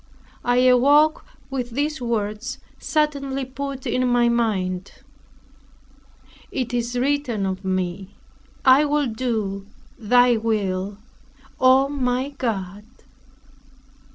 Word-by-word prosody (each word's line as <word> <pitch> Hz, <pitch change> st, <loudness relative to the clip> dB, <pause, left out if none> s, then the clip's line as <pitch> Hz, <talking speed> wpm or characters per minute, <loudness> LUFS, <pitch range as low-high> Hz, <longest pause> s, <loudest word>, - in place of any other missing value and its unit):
I 245 Hz, 0 st, +2 dB
awoke 285 Hz, +5 st, +4 dB, 0.3 s
with 250 Hz, -2 st, -3 dB
these 295 Hz, 0 st, -1 dB
words 215 Hz, -2 st, -3 dB, 0.2 s
suddenly 280 Hz, -3 st, -1 dB
put 270 Hz, 0 st, -6 dB
in 255 Hz, 0 st, 0 dB
my 245 Hz, -1 st, +3 dB
mind, 195 Hz, -6 st, -1 dB, 1.6 s
"It 250 Hz, -3 st, -3 dB
is 240 Hz, 0 st, -1 dB
written 255 Hz, -6 st, 0 dB
of 190 Hz, 0 st, -3 dB
me, 185 Hz, +1 st, -3 dB, 0.5 s
I 265 Hz, +2 st, +7 dB
will 295 Hz, 0 st, +1 dB
do 220 Hz, -5 st, -3 dB, 0.3 s
thy 245 Hz, +1 st, +4 dB
will, 200 Hz, -3 st, -2 dB, 0.6 s
O 260 Hz, +1 st, +5 dB
my 260 Hz, -1 st, -1 dB
God." 210 Hz, -8 st, -4 dB
245 Hz, 100 wpm, -22 LUFS, 205-270 Hz, 1.6 s, I